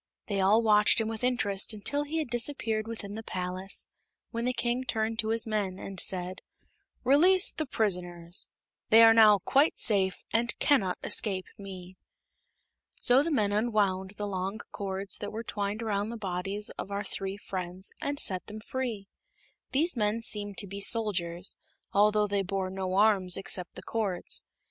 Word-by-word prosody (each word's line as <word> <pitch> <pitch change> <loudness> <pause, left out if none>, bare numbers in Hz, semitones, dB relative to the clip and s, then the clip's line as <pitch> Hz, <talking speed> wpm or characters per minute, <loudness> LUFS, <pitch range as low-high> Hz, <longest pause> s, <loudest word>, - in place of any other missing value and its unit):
They 200 -2 -2
all 205 +4 +4
watched 210 0 +5
him 225 - -1
with 225 +1 -5
interest 220 -5 +1
until 285 +8 0
he 310 +3 -3
had 305 -6 -2
disappeared 230 -3 -1
within 220 -3 -6
the 220 - -5
palace, 185 -1 -3 0.5
when 230 0 -3
the 250 - +2
King 240 +1 -1
turned 225 -2 -2
to 220 - +1
his 225 0 +2
men 205 -4 -2
and 195 -1 -6
said: 180 0 0 0.6
"Release 355 +9 +5
the 310 - -3
prisoners. 175 -6 -2 0.4
They 225 +1 +8
are 225 0 +8
now 215 -2 +7
quite 285 +4 +3
safe, 195 -4 +2
and 230 +1 +1
cannot 205 -11 +2
escape 190 -4 0
me." 185 -2 -10 1.0
So 250 +2 +4
the 320 - -1
men 215 -10 +1
unwound 205 -3 0
the 205 - -3
long 195 +1 -3
cords 195 0 -3
that 205 - -5
were 225 +2 -5
twined 205 0 -3
around 205 -1 -1
the 235 - -5
bodies 195 +1 -3
of - - -5
our 200 +1 -3
three 195 0 -5
friends, 185 -1 -4
and 285 0 -2
set 185 -2 0
them 210 +1 -8
free. 225 -3 -4 0.6
These 315 +5 +3
men 220 0 0
seemed 205 -3 -1
to - - -3
be 200 +1 -7
soldiers, 185 -6 0 0.4
although 210 +1 +4
they 200 -1 0
bore 190 0 -3
no 190 -1 -3
arms 195 -3 +4
except 195 -2 -3
the - - -9
cords. 205 -6 0
210 Hz, 170 wpm, -29 LUFS, 190-225 Hz, 1.0 s, They